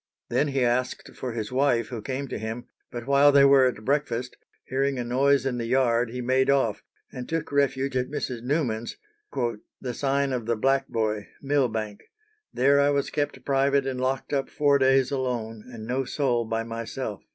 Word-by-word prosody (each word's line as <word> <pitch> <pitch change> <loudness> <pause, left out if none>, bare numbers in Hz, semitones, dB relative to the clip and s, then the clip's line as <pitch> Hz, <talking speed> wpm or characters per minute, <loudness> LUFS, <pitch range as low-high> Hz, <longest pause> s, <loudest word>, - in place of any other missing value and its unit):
Then 150 - +2
he 135 -2 0
asked 125 +1 -1
for 125 -2 -5
his 110 -1 -4
wife, 125 -3 +2
who 120 -4 -5
came 135 +4 -4
to - - -4
him; 110 +2 -5 0.2
but 120 -1 -7
while 140 +1 +5
they 140 -1 +6
were 135 -1 +6
at 110 -3 -4
breakfast, 130 -3 -1 0.3
hearing 135 +1 0
a 125 - -2
noise 135 +3 +2
in 125 -2 -1
the 115 - -3
yard, 120 -2 +2
he 125 +2 -5
made 130 +2 +2
off, 125 -7 +2 0.3
and 125 -2 -7
took 165 -2 -2
refuge 140 -1 +1
at 125 0 0
Mrs. 130 -5 -4
Newman's, 125 -4 -2 0.8
"the 125 -2 -4
sign 140 +1 0
of 120 -3 -3
the 115 - +1
Black 135 +4 +1
boy, 110 -3 -2
Millbank; 115 -7 -1 0.5
there 140 +3 +3
I 140 0 +4
was 140 -1 0
kept 145 -1 -3
private 140 0 +2
and 130 -1 -3
locked 130 +2 -2
up 135 -1 0
four 145 -1 +3
days 135 0 +3
alone 120 -5 -3
and 110 -2 -8
no 130 +3 -1
soul 125 -3 0
by 115 0 -2
myself." 115 -1 -5
130 Hz, 185 wpm, -26 LUFS, 120-140 Hz, 0.8 s, they